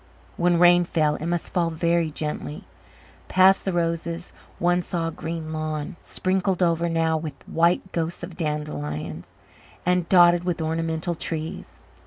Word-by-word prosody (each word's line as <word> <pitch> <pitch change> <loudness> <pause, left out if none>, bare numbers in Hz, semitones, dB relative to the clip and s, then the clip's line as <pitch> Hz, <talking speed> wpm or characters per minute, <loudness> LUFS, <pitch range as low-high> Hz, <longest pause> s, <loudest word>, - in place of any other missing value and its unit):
When 175 0 +2
rain 175 0 +6
fell 155 -3 +1
it 155 - -5
must 175 -1 -2
fall 175 -3 +2
very 170 0 +1
gently. 150 - -5 0.6
Past 190 +1 +5
the 190 - +1
roses 170 0 -2 0.2
one 175 +1 +2
saw 170 -2 -2
a - - -6
green 160 0 -5
lawn, 155 +2 -3
sprinkled 185 0 0
over 170 0 +2
now 165 -1 +1
with 155 -1 -6
the - - -17
white 170 +3 +2
ghosts 170 +1 -3
of 175 -1 -7
dandelions, 90 - -4 0.5
and 180 -1 +1
dotted 175 -1 +6
with 175 -2 -1
ornamental 160 +2 -1
trees. 160 -1 -6
165 Hz, 150 wpm, -24 LUFS, 160-175 Hz, 0.6 s, rain